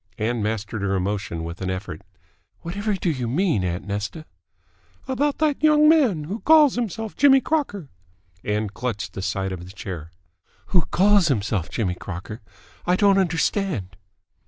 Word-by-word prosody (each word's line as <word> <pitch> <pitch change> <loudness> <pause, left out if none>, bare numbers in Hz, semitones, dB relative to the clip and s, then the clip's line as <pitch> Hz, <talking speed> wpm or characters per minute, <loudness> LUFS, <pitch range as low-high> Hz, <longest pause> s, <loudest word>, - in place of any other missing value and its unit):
Ann 115 +1 -1
mastered 110 0 -3
her 100 0 0
emotion 95 -3 -2
with 85 +3 -7
an 95 - -2
effort. 95 -4 -5 0.6
"Whatever 205 +5 -2
do 180 -2 0
you 130 -5 -3
mean, 145 - +1
aunt 90 +1 -3
Nesta?" 105 +10 -4 0.8
"About 280 +2 0
that 305 -3 +1
young 305 0 +5
man, 265 - +4
who 195 +9 -5
calls 305 -2 +6
himself 225 -2 -3
Jimmy 270 -1 +6
Crocker." 260 - -2 0.6
Ann 105 +1 -1
clutched 100 -5 -4
the 95 - -5
side 95 0 -2
of 90 -2 -6
the 90 - -11
chair. 90 -5 -7 0.6
"Who 180 -3 +3
calls 200 -1 +4
himself 105 - -1
Jimmy 95 -6 -1
Crocker? 95 +5 -7 0.4
I 180 - +2
don't 200 0 +4
understand." 170 - -1
125 Hz, 155 wpm, -23 LUFS, -, 0.8 s, calls